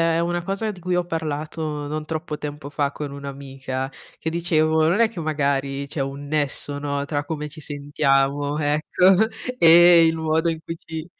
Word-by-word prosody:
è - - +1
una 175 0 -1
cosa 200 +4 -2
di 190 - -12
cui 180 +1 -1
ho 180 - +1
parlato 155 -2 -4
non 155 +1 -4
troppo 155 -1 -4
tempo 145 -1 -7
fa 145 -1 -1
con 145 -2 -5
un'amica 135 -1 -6 0.3
che 160 - -3
dicevo: 160 -2 +2
"Non 185 +8 +2
è 225 - +4
che 210 - -8
magari 140 -3 -1
c'è 145 - -5
un 140 +1 -5
nesso, 145 -1 0
no, 140 -1 -2
tra 145 0 -3
come 150 -1 -4
ci 155 +2 -10
sentiamo, 145 0 0
ecco, 160 +7 +3 0.3
e 170 -2 +8
il 160 0 +2
modo 160 +1 0
in 160 -1 -3
cui 165 - -6
ci" 160 -1 -7
155 Hz, 180 wpm, -23 LUFS, 145-165 Hz, 0.3 s, e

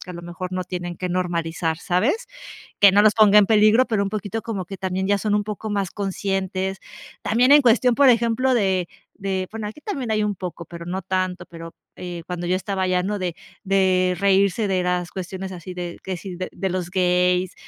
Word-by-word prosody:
que, 180 - -9
a - - -6
lo 170 - -7
mejor, 175 +1 -6
no 185 0 -2
tienen 175 -1 -5
que 180 - -3
normalizar, 170 -2 -1
¿sabes? 235 - 0 0.5
Que 200 -1 +8
no 205 - +6
los 215 0 +5
ponga 210 -1 +6
en 205 - +5
peligro, 215 +3 +5
pero 210 -3 +1
un 200 - -2
poquito 210 +1 -4
como 220 -5 -4
que 195 +2 -8
también 190 0 -2
ya 200 0 +3
son 205 +1 0
un 210 - +1
poco 215 +1 -5
más 200 -3 -1
conscientes. 195 -1 -2 0.5
También 245 +4 +3
en 295 +1 +8
cuestión, 250 0 +4
por 280 +1 +5
ejemplo, 235 +2 +2
de 190 -6 +1 0.3
de 190 -2 -3
bueno, 220 -1 -5
aquí 220 +8 -10
también 275 - -4
hay 215 -1 +1
un 210 0 0
poco, 175 -2 -7
pero 170 0 -9
no 185 +1 -3
tanto, 185 -1 -2
pero, 165 0 -10 0.2
eh, 175 -2 -7
cuando 175 -1 -4
yo 180 - +2
estaba 190 0 -2
allá, 185 -1 +1
¿no?, 205 +2 -2
de 180 -3 -3 0.3
de 185 -2 +2
reírse 200 +2 +2
de 190 -2 +1
las 180 -1 -1
cuestiones 190 +1 -6
así 180 0 -8
de 175 -1 -6
que 190 -1 -4
si 185 0 -8
de 185 - -4
de 190 +1 -3
los 180 -1 -3
gays, 180 0 +1
190 Hz, 215 wpm, -22 LUFS, 180-210 Hz, 0.5 s, Que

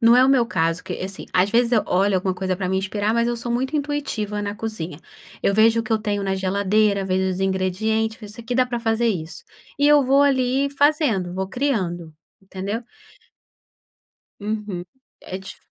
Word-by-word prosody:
não 230 0 +6
é 255 - +6
o - - +3
meu 250 -4 +4
caso 165 -4 0
que, - - -5
assim, 190 +1 -6
às 185 +3 +2
vezes 235 +2 +2
eu 220 - +4
olho 195 +2 +2
alguma 185 0 +1
coisa 185 0 -2
pra 185 -1 -2
me 190 - +1
inspirar, 205 +2 -1
mas 235 +1 +2
eu 240 - -1
sou 235 +1 -4
muito 265 +5 -1
intuitiva 280 -8 -2
na 205 0 -3
cozinha. 210 -8 -5 0.4
Eu - - +3
vejo 225 +2 +5
o - - -4
que 225 - -3
eu 220 - +3
tenho 205 -2 -2
na 195 -1 0
geladeira, 200 +1 +1
vejo 190 0 0
os 185 - -3
ingredientes, 195 +4 0
vejo 210 -2 -10
isso 235 - -9
aqui 235 +2 -4
dá 255 +1 +4
pra 245 -1 -4
fazer 230 0 +1
isso. 175 -5 -4 0.3
E 285 - +4
eu 295 -1 +6
vou 275 +2 +4
ali 270 0 +2
fazendo, 280 - +1
vou 190 +1 -2
criando, 190 - -2 0.3
entendeu? 195 +4 -5 1.6
Uhum, 205 -4 -4 0.4
é 185 - -6
dif 190 - -9
215 Hz, 200 wpm, -22 LUFS, 190-240 Hz, 1.6 s, não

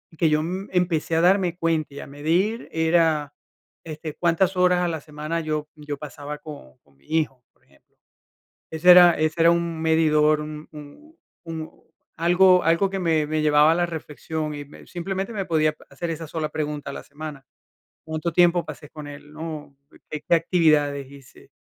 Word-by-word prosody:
Que 160 0 +2
yo, 150 0 +2
mm, 185 +5 -4
empecé 170 -3 0
a 165 - +3
darme 180 -1 +3
cuenta, 165 -4 -1
y 140 - -8
a - - -8
medir 170 +11 -1
era, 160 -3 +2 0.5
este, 155 -1 -7
cuántas 175 +2 +1
horas 180 0 +3
a 175 - +1
la 160 -3 -3
semana 155 +3 -4
yo 155 -1 -3
yo 150 -1 -6
pasaba 145 +1 -7
con 145 - -12
con 70 -1 -30
mi 70 - -29
hijo, 150 -6 -1
por - - -36
ejemplo. - - -30 0.7
Ese 160 +3 +2
era 175 -1 +9
ese 155 +1 0
era 170 +1 +6
un 170 -1 -1
medidor, 155 -1 +3
un 150 0 -8
un 155 - -13 0.3
un 160 -1 -6 0.5
algo 180 +2 +5
algo 170 +4 +2
que 195 - -3
me 160 -4 +1
me 155 0 -1
llevaba 150 0 +5
a - - +2
la 175 0 +1
reflexión, 155 -1 -5
y 145 0 -7
me 145 - -15
simplemente, 190 +4 -4
me 200 -4 -3
podía 155 -3 +1
hacer 170 - -5
esa 165 0 -5
sola 155 0 -3
pregunta 150 -2 -4
a - - -6
la - - -8
semana. 145 -2 -9 0.6
Cuánto 160 +1 -3
tiempo 175 0 +4
pasé 150 -1 -9
con 150 -2 -9
él, 145 +1 -11
¿no? 155 -2 -7 0.3
Qué 150 - -6
qué - - +4
actividades 150 -5 +2
hice. 140 -2 -16
160 Hz, 185 wpm, -23 LUFS, 150-170 Hz, 0.7 s, era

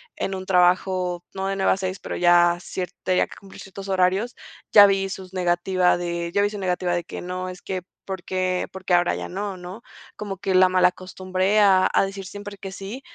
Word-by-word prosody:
en 195 - -3
un 190 0 -6
trabajo, 180 -1 +2
no 190 0 -3
de 195 - -1
9:00-6:00, 190 -1 0
pero - - -6
ya 175 0 +4
cier 180 0 -5
tenía 185 -1 +2
que - - -13
cumplir 195 -1 -14
ciertos 195 +1 -9
horarios, 190 +5 +1 0.4
ya 205 -1 +10
vi 195 -1 +1
sus 190 -1 -8
negativa 180 0 +2
de 170 -1 -3
ya 200 +3 +2
vi 205 - +1
su 210 - -6
negativa 180 -1 -1
de 175 0 -1
que - - -8
no, 185 +1 -4
es 180 0 -10
que, 185 -1 -3 0.2
por 190 -2 -5
qué 185 -1 -1
por 190 0 -10
qué 185 - +1
ahora 175 0 +3
ya - - -5
no, 195 +1 -4
¿no? 180 +5 -9 0.3
Como 200 -2 -6
que 195 0 -2
la 185 0 +6
malacostumbré 185 +2 +1
a 190 -2 +5
a - - +3
decir 195 0 -7
siempre 205 +1 -8
que 195 - -7
sí, 200 +7 -7
185 Hz, 210 wpm, -23 LUFS, 180-195 Hz, 0.4 s, ya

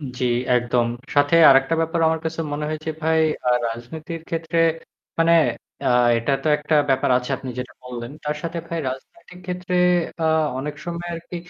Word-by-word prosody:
উ - - -13 0.2
জ্বি 125 - 0 0.3
একদম। 120 0 +1 0.3
সাথে 145 +3 +4
আরেকটা 135 +3 +4
ব্যাপার 165 +1 -1
আমার 160 0 0
কাছে 165 0 -3
মনে 150 +1 -3
হয়েছে 155 +1 -4
ভাই 160 0 +2 0.3
আ - - +4 0.2
রাজনীতির 155 +8 -7
ক্ষেত্রে 165 0 -2 0.6
মানে 165 0 +4 0.5
অ্যা - - +1 0.3
এটা 115 +4 -1
তো 155 - 0
একটা 150 +1 -1 0.2
ব্যাপার 130 0 +2
আছে 125 +2 -7
আপনি 130 - -7
যেটা 125 - -5
বললেন। 120 0 -7
তার 150 0 -2
সাথে 170 0 -4
ভাই 170 - -3
রাজনৈতিক 180 - -10
ক্ষেত্রে 180 0 -3 0.5
আ - - +1 0.3
অনেক 145 +2 -4
সময় 175 0 -5
আরকি 170 +1 -8
155 Hz, 170 wpm, -22 LUFS, 130-165 Hz, 0.6 s, সাথে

